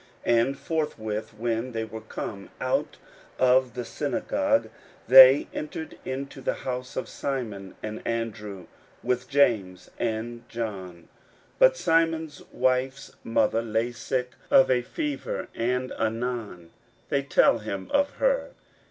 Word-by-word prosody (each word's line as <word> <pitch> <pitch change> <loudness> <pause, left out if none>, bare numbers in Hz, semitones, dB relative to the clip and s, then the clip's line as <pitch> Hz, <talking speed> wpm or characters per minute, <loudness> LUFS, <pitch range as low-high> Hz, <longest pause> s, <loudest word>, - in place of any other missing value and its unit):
41:001:029 120 -1 +4
And 135 0 -4
forthwith, 110 -11 -3
when 115 +2 -1
they 115 0 -2
were 110 0 -8
come 105 -2 -7
out - - -1 0.4
of 130 -1 +3
the 125 -1 -4
synagogue, 280 - 0 0.4
they 130 +2 +9
entered 155 +1 -6
into 135 +1 -5
the - - -1
house 125 -1 -5
of 130 - -3
Simon 110 -9 -4
and 110 0 -5
Andrew, 105 -5 -4 0.4
with 125 +1 -1
James 105 -10 +1
and 120 +1 -3
John. 105 -6 -4
41:001:030 85 - -20 0.5
But - - +6
Simon's 165 - +1
wife's 130 +2 0
mother 115 0 +2
lay 115 +1 -1
sick 125 +1 -3 0.2
of 135 - +6
a 125 -1 +3
fever, 310 - -4
and 125 +2 -1
anon 110 -6 -3 0.4
they 140 - +1
tell 135 -3 +4
him 100 -3 -5
of 285 0 +2
her. - - +1
125 Hz, 130 wpm, -26 LUFS, 110-140 Hz, 0.5 s, they